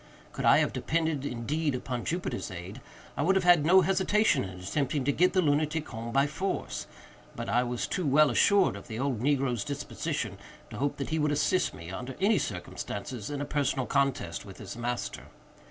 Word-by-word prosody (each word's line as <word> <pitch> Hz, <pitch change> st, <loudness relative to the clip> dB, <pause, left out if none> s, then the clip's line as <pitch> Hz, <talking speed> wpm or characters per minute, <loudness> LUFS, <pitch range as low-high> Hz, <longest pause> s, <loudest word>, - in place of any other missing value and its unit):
Could -, -, -4 dB
I -, -, +7 dB
have -, -, +1 dB
depended, 160 Hz, -3 st, -1 dB
indeed, 145 Hz, +5 st, -1 dB
upon 125 Hz, -1 st, -4 dB
Jupiter's 175 Hz, -7 st, -2 dB
aid, 95 Hz, +6 st, -8 dB, 0.3 s
I -, -, -2 dB
would 185 Hz, +6 st, +3 dB
have 190 Hz, -, +2 dB
had 175 Hz, -4 st, +6 dB
no 185 Hz, +4 st, +6 dB
hesitation 190 Hz, -2 st, +2 dB
in 95 Hz, -1 st, -7 dB
attempting 130 Hz, +9 st, -1 dB
to 145 Hz, -, +2 dB
get 180 Hz, +6 st, +3 dB
the 185 Hz, -1 st, +3 dB
lunatic 155 Hz, +1 st, +1 dB
home 115 Hz, +1 st, -6 dB
by 135 Hz, +2 st, +3 dB
force; 160 Hz, +7 st, -3 dB, 0.5 s
but -, -, -5 dB
I 120 Hz, -, +3 dB
was 120 Hz, -1 st, -2 dB
too 180 Hz, -5 st, -2 dB
well 145 Hz, +1 st, +5 dB
assured 200 Hz, -, +4 dB
of -, -, -10 dB
the 110 Hz, -, -5 dB
old 130 Hz, -2 st, -1 dB
negro's 130 Hz, -3 st, +1 dB
disposition, 140 Hz, -1 st, -4 dB, 0.3 s
to -, -, -7 dB
hope 140 Hz, +3 st, -1 dB
that 140 Hz, -, -4 dB
he 160 Hz, -, +1 dB
would 150 Hz, -1 st, +2 dB
assist 150 Hz, +5 st, +1 dB
me, 85 Hz, +1 st, -9 dB
under 125 Hz, +7 st, -6 dB
any 200 Hz, 0 st, +3 dB
circumstances, 105 Hz, -3 st, -5 dB
in 145 Hz, -1 st, -3 dB
a -, -, -2 dB
personal 140 Hz, -3 st, 0 dB
contest 135 Hz, -12 st, 0 dB
with 95 Hz, -2 st, -11 dB
his 100 Hz, -1 st, -8 dB
master. 120 Hz, +1 st, -4 dB
140 Hz, 195 wpm, -29 LUFS, 120-160 Hz, 0.5 s, I